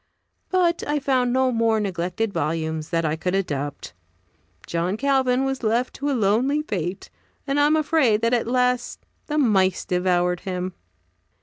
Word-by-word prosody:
But 350 -2 +2
I 295 0 +1
found 260 -3 +1
no 260 0 +2
more 225 -2 +2
neglected 190 +2 -2
volumes 160 0 -2
that 165 -2 0
I 155 0 0
could 180 +3 -2
adopt. 145 -7 -3 0.7
John 175 +4 -1
Calvin 265 -1 +2
was 270 -1 -2
left 235 +2 0
to 285 +1 -2
a - - +1
lonely 240 +8 +2
fate, 180 - -4 0.3
and 275 +1 0
am 295 +2 +4
afraid 295 -8 +2
that 230 +1 +1
at 235 -2 +1
last 250 0 0 0.2
the 300 - -2
mice 195 - +2
devoured 180 -1 +1
him. 185 -1 -4
225 Hz, 150 wpm, -23 LUFS, 180-265 Hz, 0.7 s, am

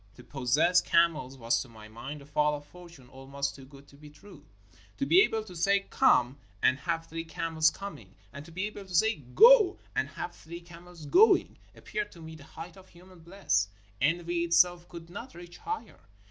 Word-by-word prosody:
To - - -14
possess 145 +7 +2
camels 155 -6 +1
was 115 -1 0
to 130 - -9
my 110 -2 -13
mind 135 +7 -9
a - - -16
fall 150 +1 +1
of 145 0 -10
fortune 170 -6 -15
almost 135 +2 -5
too 135 - -13
good 140 +1 -16
to - - -18
be 150 +1 -14
true. 200 +7 -17 0.5
To 275 - -1
be 360 +6 +6
able 225 - +1
to 185 -4 -12
say 195 +4 +2
"Come" 125 +3 +3 0.2
and 130 +5 +2
have 165 0 -3
three 165 0 -6
camels 160 -1 0
coming; 115 - -10 0.2
and 140 0 -9
to 165 - -14
be 185 +4 -3
able 210 -1 -8
to 180 - -6
say 220 +1 +2 0.2
''Go" 445 -3 +7 0.2
and - - -1
have - - -7
three 170 +2 -10
camels 170 -1 -13
going, 410 - +4 0.2
appeared 210 -1 -5
to 170 - -15
me 160 0 -10
the 155 -2 -13
height 165 +4 -11
of 190 0 -17
human 180 +1 -17
bliss 165 - -1 0.2
— 100 0 -31
envy 170 +2 0
itself 175 +1 +2
could 170 -1 -11
not 245 +8 -9
reach 175 0 -12
higher. 440 +1 -6
165 Hz, 200 wpm, -29 LUFS, 140-180 Hz, 0.5 s, Go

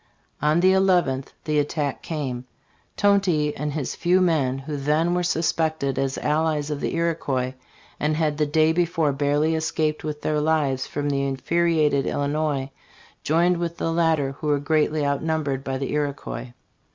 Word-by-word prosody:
On 150 +3 +3
the 185 +1 +5
nth 175 -9 +2 0.2
the 150 -1 +1
attack 145 -1 -2
came. 130 -6 -4 0.5
Tonty 185 -7 +2
and 150 +1 -3
his 145 -4 -3
few 180 +2 +2
men, 155 -8 +2
who 140 +2 -5
then 150 +5 +1
were 180 - +1
suspected 160 -4 0
as 135 -1 -1
allies 150 -1 0
of 145 - -3
the - - -2
Iroquois 140 -6 -1 0.5
and 150 +1 0
had 155 -2 0
the 150 - +2
day 155 +1 +3
before 165 -3 +1
barely 145 +3 +1
escaped 160 -1 -1
with 150 -1 -5
their 150 -1 +1
lives 150 -4 +1
from 145 0 -3
the 140 -1 0
infuriated 150 +1 +1
Illinois, 145 -1 -1 0.5
joined 170 +3 +2
with 170 0 -3
the 165 - -1
latter, 160 -5 +2
who 155 - -4
were 145 -1 +3
greatly 150 +1 +1
outnumbered 140 -1 -1
by 135 -1 -2
the 135 0 -3
Iroquois. 140 -4 -3
150 Hz, 160 wpm, -24 LUFS, 140-160 Hz, 0.5 s, the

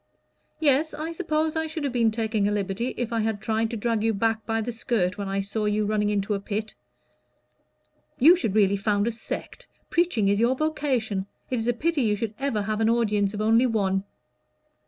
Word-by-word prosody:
"Yes, 305 +1 +2
I 315 +2 -4
suppose 315 -2 -1
I 320 0 -1
should 315 -1 -5
have 275 -3 -2
been 235 -2 +3
taking 220 -2 0
a - - 0
liberty 205 +4 -2
if 235 -1 -2
I 230 - +1
had 220 -1 -1
tried 220 +1 0
to 230 - -4
drag 225 0 0
you 225 -1 +1
back 225 +1 0
by 225 0 0
the 230 +2 -2
skirt 210 -5 -1
when 200 - -3
I 195 0 -1
saw 210 +2 -3
you 210 0 +1
running 210 0 +1
into 205 0 0
a 200 - -1
pit." 210 +2 -4 1.4
"You 325 +8 +7
should 220 - -2
really 200 -2 +4
found 205 0 +1
a 235 - +1
sect. 235 - -7 0.2
Preaching 335 - +2
is 200 +1 +2
your 240 +3 +3
vocation. 255 -10 -1 0.2
It 255 - +1
is 225 - -2
a 245 - +3
pity 310 +5 0
you 215 -3 +2
should 220 0 -3
ever 270 -7 -1
have 215 +1 -2
an 220 - +3
audience 210 -3 +1
of 210 - -3
only 225 +4 +4
one." 195 -4 0
225 Hz, 210 wpm, -25 LUFS, 205-250 Hz, 1.4 s, You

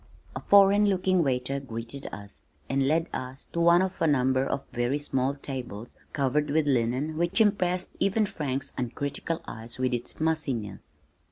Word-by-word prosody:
A - - -2
foreign 200 +1 +5
looking 185 -2 +2
waiter 135 -1 0
greeted 120 +1 -4
us, 100 0 -10 0.3
and 135 0 +1
led 165 +3 +2
us 130 +2 -6
to 170 - -1
one 170 +2 +6
of 190 -1 -4
a 165 - +4
number 130 -2 +2
of 135 0 -2
very 120 +3 0
small 135 -2 -1
tables 125 -6 -6 0.2
covered 145 +1 0
with 155 +1 +2
linen 135 +4 0
which 175 +3 +1
impressed 185 -4 +2
even 210 +2 +2
Frank's 140 -7 -4
uncritical 140 +6 -3
eyes 115 +1 -8
with 130 0 0
its 120 -1 -4
mussiness. 135 -11 -2
140 Hz, 160 wpm, -27 LUFS, 125-170 Hz, 0.3 s, one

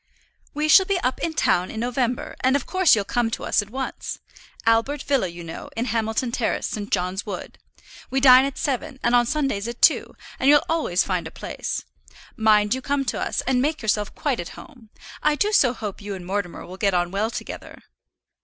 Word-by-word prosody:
"We 300 +1 0
shall 380 +4 +7
be 395 -2 +1
up 255 - -1
in 325 -1 -2
town 180 -10 +2
in 220 - -6
November, 245 0 -2
and 260 +1 +2
of 280 - -1
course 370 -8 +4
you'll 205 -2 -1
come 235 +2 0
to - - -5
us - - +2
at 205 - -10
once. 265 +3 -5 0.5
Albert 230 +6 +2
Villa, 275 -9 +1
you 170 0 -9
know, 165 -1 -8
in 230 - 0
Hamilton 225 +1 -1
Terrace, 235 -2 -1
St. 205 -1 -4
John's 185 +1 -1
Wood. 200 -5 -7 0.5
We 270 - +1
dine 260 -1 +8
at 275 - -4
seven, 265 -1 -3
and 240 - +2
on 240 -1 +4
Sundays 270 -7 -1
at 235 0 -6
two; 325 - +3 0.2
and 265 - +3
you'll 295 0 +6
always 310 - +1
find - - -2
a - - -10
place. - - -5 0.5
Mind 215 -2 +3
you 260 - -3
come 280 +1 -1
to - - -2
us, - - -1
and 255 -1 +1
make 305 0 -1
yourself 210 -1 0
quite 280 -5 -1
at 175 - -7
home. 250 -8 -14 0.3
I 300 0 +2
do 415 +7 +1
so 275 - +4
hope 215 -5 -6
you 200 -1 -5
and 180 -2 -9
Mortimer 190 -3 -3
will 180 +2 -10
get 200 -2 +1
on 175 0 0
well 205 +3 0
together." - - -7
240 Hz, 210 wpm, -23 LUFS, 205-275 Hz, 0.5 s, dine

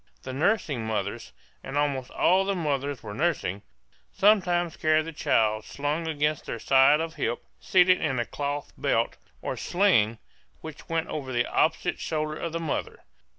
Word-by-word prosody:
The 130 - -6
nursing 155 - 0
mothers 100 -2 -3 0.3
and 140 - -4
almost 140 -3 0
all 185 +2 +3
the 195 0 -1
mothers 145 -5 -2
were 105 -2 -6
nursing 125 - -1 0.5
sometimes 175 -5 +3
carried 155 -1 +2
the 165 - -5
child 110 -6 +1
slung 150 +6 -3
against 150 -1 -1
their - - -3
side 135 +5 +5
of 165 0 -3
hip, 120 -6 -3
seated 185 -2 +4
in 135 -4 0
a 120 - 0
cloth 145 +2 -4
belt, - - 0 0.3
or - - -2
sling, 165 - +2 0.4
which 160 -2 -10
went 165 0 -1
over 135 -4 -4
the 120 -1 +1
opposite 160 0 0
shoulder 155 -1 -2
of 170 - -4
the 165 - -3
mother. 160 -3 -4
150 Hz, 160 wpm, -27 LUFS, 130-165 Hz, 0.5 s, side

